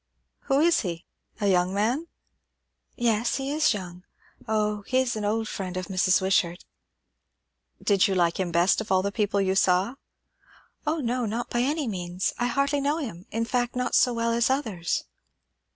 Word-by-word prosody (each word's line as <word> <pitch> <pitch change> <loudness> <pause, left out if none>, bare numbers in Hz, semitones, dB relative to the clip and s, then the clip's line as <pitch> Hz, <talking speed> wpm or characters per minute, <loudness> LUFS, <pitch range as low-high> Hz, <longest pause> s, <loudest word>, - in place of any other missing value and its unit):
"Who 275 0 +2
is 340 +1 +4
he? 170 -3 -4 0.3
A 210 - -1
young 185 -1 +2
man?" 240 +11 0 0.9
"Yes, 235 -1 +1
he 270 +1 -3
is 305 +1 +3
young. 180 -4 -5 0.4
O, 210 -1 0
he 255 - +1
is 260 -2 +1
an 215 - -3
old 220 +2 0
friend 185 -4 -5
of 185 +1 -4
Mrs. 185 0 +3
Wishart." 180 -2 +1 1.2
"Did 200 -3 +4
you 195 - -1
like 170 -1 +1
him 180 -2 -1
best 175 +5 +3
of 220 - -7
all 190 0 +3
the 200 - -1
people 205 -1 0
you 190 -1 +1
saw?" 190 +3 +2 0.9
"O 310 +1 0
no, 245 -1 -1
not 230 +3 -3
by 240 - 0
any 285 +3 0
means. 180 -3 -2
I 245 - +1
hardly 280 +3 +1
know 290 +3 +1
him, 215 - -6
in 225 +1 -1
fact; 245 0 -1
not 250 0 -1
so 250 - +5
well 230 0 0
as 235 +1 +2
others." 220 - -1
215 Hz, 180 wpm, -26 LUFS, 185-250 Hz, 1.2 s, so